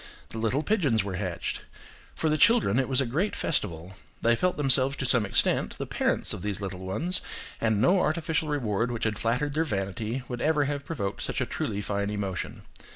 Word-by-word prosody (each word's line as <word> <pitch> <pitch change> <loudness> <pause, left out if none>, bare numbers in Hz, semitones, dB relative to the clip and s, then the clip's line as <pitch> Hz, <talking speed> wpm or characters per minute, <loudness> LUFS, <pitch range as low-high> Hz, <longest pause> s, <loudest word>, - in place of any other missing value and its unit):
The 110 - -6
little 115 +7 +1
pigeons 150 - +2
were 95 -2 -4
hatched. 90 -4 -3 0.5
For 160 - 0
the 155 - +3
children 180 - +5
it 130 - 0
was 130 0 +3
a - - +1
great 160 - -1
festival. 90 - -2 0.3
They 115 0 +5
felt 180 +9 0
themselves 135 -1 +4
to 140 - -3
some 120 -4 +3
extent - - +1
the - - -3
parents - - 0
of - - -6
these 105 -1 -2
little 95 -2 -5
ones, 150 - -2 0.4
and 110 -2 +2
no 180 - +4
artificial 160 -1 0
reward 120 -6 0
which 120 -2 -3
had 110 -2 0
flattered 130 +6 0
their 160 +2 +2
vanity 110 - -3
would 125 -1 -5
ever 150 -1 +3
have 145 0 -3
provoked 100 -12 -3
such - - -2
a - - +1
truly 100 - -3
fine 100 0 -1
emotion. 100 -3 -4
120 Hz, 200 wpm, -27 LUFS, 100-150 Hz, 0.5 s, children